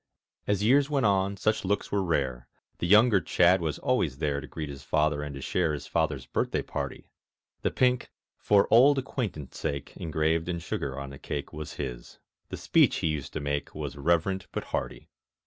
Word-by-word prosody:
As 105 -1 +1
years 135 +5 +4
went 140 -5 +1
on 100 0 +2
such 110 +3 0
looks 100 +2 -1
were 100 - +1
rare; 65 -8 -1 0.3
The 85 - -1
younger 105 +1 +6
Chadd 90 +1 +4
was 80 -3 -2
always 85 - 0
there 70 -2 -1
To - - -9
greet 80 -1 -5
his 70 -1 -8
father 75 -1 +1
and 75 -1 -5
to 70 - -7
share 85 +2 0
His 75 - -5
father's 75 -6 -1
birthday - - -1
party; - - -5 0.5
The - - +1
pink 125 -1 +1 0.3
"For 100 -1 +3
auld 135 +5 +7
acquaintance 115 - -4
sake" 70 -2 -4
Engraved 80 +1 0
in 85 - -1
sugar 70 -5 -4
on 70 0 -6
the 70 - -10
cake 70 -1 -5
Was 75 -1 -6
his. 60 -4 -6 0.3
The - - -5
speech - - +3
he 80 - 0
used 75 -3 -3
to - - -2
make 70 0 -3
Was 75 -2 -5
reverent 85 +6 0
but - - -3
hearty. - - -3
80 Hz, 190 wpm, -28 LUFS, 70-100 Hz, 0.5 s, auld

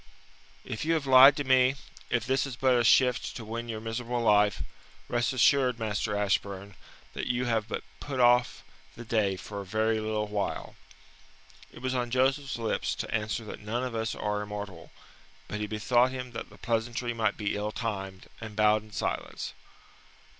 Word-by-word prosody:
"If - - -4
you 165 +1 +2
have 155 -3 -1
lied 135 +2 +8
to 145 - -1
me, 130 0 +4 0.3
if 120 -2 0
this 135 +1 +1
is 130 - -6
but 130 0 +3
a 120 - +3
shift 125 +1 +3
to 115 - -7
win 115 +2 -5
your 110 -1 -3
miserable 120 +2 -3
life, 105 - +3 0.4
rest 120 0 0
assured, 130 0 +3
Master 105 -1 -2
Ashburn, 100 -1 -1 0.4
that - - -4
you 125 0 0
have 110 -3 0
but - - -4 0.2
put 135 -3 -5
off 120 0 +4 0.3
the 120 - -9
day 105 -4 +1
for 100 +2 -7
a - - -6
very 110 +3 0
little 110 0 -1
while." 105 -1 -3 1.0
It 120 - -13
was 130 0 -1
on 125 -2 -1
Joseph's 135 +2 +1
lips 115 -2 -1
to - - -5
answer 110 +2 -1
that - - -8
none 115 +4 -3
of 125 -2 -3
us 115 0 -2
are 105 0 -2
immortal, 105 -4 -7 0.6
but 105 - -4
he 105 - -2
bethought 120 +4 +2
him 130 -1 -6
that 115 - -6
the - - -16
pleasantry 120 +1 -1
might 115 -1 0
be 105 -2 -1
ill 105 +1 -2
timed, 95 -5 -4 0.2
and 110 -2 -7
bowed 105 0 +4
in 110 0 -17
silence. - - -3
115 Hz, 180 wpm, -29 LUFS, 105-125 Hz, 1.0 s, lied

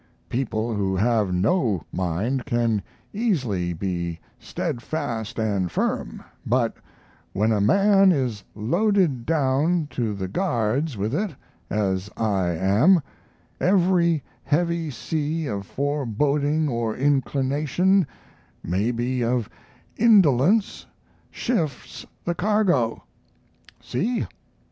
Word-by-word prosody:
People 115 -2 -1
who 95 -2 0
have 105 -1 +2
no 100 - +1
mind 100 +9 -1
can 115 -3 +1 0.3
easily 130 - 0
be 85 -1 -3 0.2
stead 120 - -4
fast 115 -6 -4
and 100 -6 0
firm, - - -2 0.2
but 120 -1 +1 0.6
when 105 +3 +1
a 105 -2 +2
man 195 - +5
is 125 - -1
loaded 170 - +1
down 155 +2 +2
to 115 -4 -2
the 95 -1 -4
guards 130 - -1
with 105 +4 -2
it, 185 -1 -1 0.3
as 95 -1 -1
I 100 -5 +1
am, 100 - +3 0.6
every 175 -4 +3 0.2
heavy 170 +1 0
sea 155 +4 -2
of 100 -6 -4
foreboding 145 +2 0
or 115 -4 -1
inclination, 145 +6 +1 0.6
maybe 120 +7 -1
of 120 -1 -1 0.5
indolence, 200 - +4 0.4
shifts 165 - -3 0.2
the 175 - 0
cargo. 180 - +1 0.8
See? 225 - -1
130 Hz, 100 wpm, -24 LUFS, 105-165 Hz, 0.8 s, man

